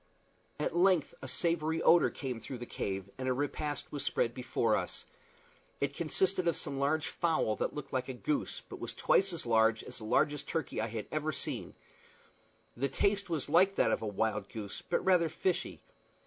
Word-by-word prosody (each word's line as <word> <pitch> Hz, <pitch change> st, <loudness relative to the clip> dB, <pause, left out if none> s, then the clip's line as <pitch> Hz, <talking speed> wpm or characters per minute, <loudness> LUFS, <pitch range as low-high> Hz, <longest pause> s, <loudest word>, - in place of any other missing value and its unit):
At -, -, -1 dB
length 175 Hz, -4 st, +4 dB
a -, -, -6 dB
savory 165 Hz, -1 st, 0 dB
odor 170 Hz, 0 st, +6 dB
came 130 Hz, -4 st, -4 dB
through 130 Hz, -, -6 dB
the 120 Hz, -, -6 dB
cave, 95 Hz, -4 st, -3 dB
and 130 Hz, 0 st, -1 dB
a -, -, +3 dB
repast 145 Hz, +2 st, -3 dB
was 145 Hz, -, -3 dB
spread 115 Hz, -, +1 dB
before 120 Hz, -3 st, +1 dB
us. 90 Hz, -3 st, -3 dB, 0.7 s
It 140 Hz, 0 st, 0 dB
consisted 185 Hz, +2 st, +1 dB
of 170 Hz, -, +2 dB
some 140 Hz, -4 st, -3 dB
large 145 Hz, +3 st, +1 dB
fowl 165 Hz, -10 st, +1 dB
that -, -, -2 dB
looked 145 Hz, -2 st, -6 dB
like 130 Hz, 0 st, -1 dB
a 130 Hz, -, -4 dB
goose, 285 Hz, -, -2 dB
but -, -, -8 dB
was -, -, -5 dB
twice 195 Hz, 0 st, +3 dB
as 170 Hz, -6 st, -5 dB
large 110 Hz, -1 st, +3 dB
as -, -, -10 dB
the 110 Hz, -, -8 dB
largest 145 Hz, +6 st, +1 dB
turkey 160 Hz, -5 st, -2 dB
that 110 Hz, -, +1 dB
I -, -, -3 dB
had 110 Hz, -1 st, -4 dB
ever 155 Hz, 0 st, 0 dB
seen. -, -, -4 dB, 1.0 s
The 140 Hz, +3 st, 0 dB
taste 200 Hz, +7 st, +1 dB
was 160 Hz, -5 st, -2 dB
like 185 Hz, +6 st, +4 dB
that -, -, +3 dB
of -, -, 0 dB
a 110 Hz, -, -3 dB
wild 105 Hz, +1 st, -1 dB
goose, 105 Hz, -3 st, -6 dB
but -, -, -1 dB
rather 180 Hz, -3 st, +4 dB
fishy. 175 Hz, +3 st, -2 dB
145 Hz, 195 wpm, -32 LUFS, 120-170 Hz, 1.0 s, odor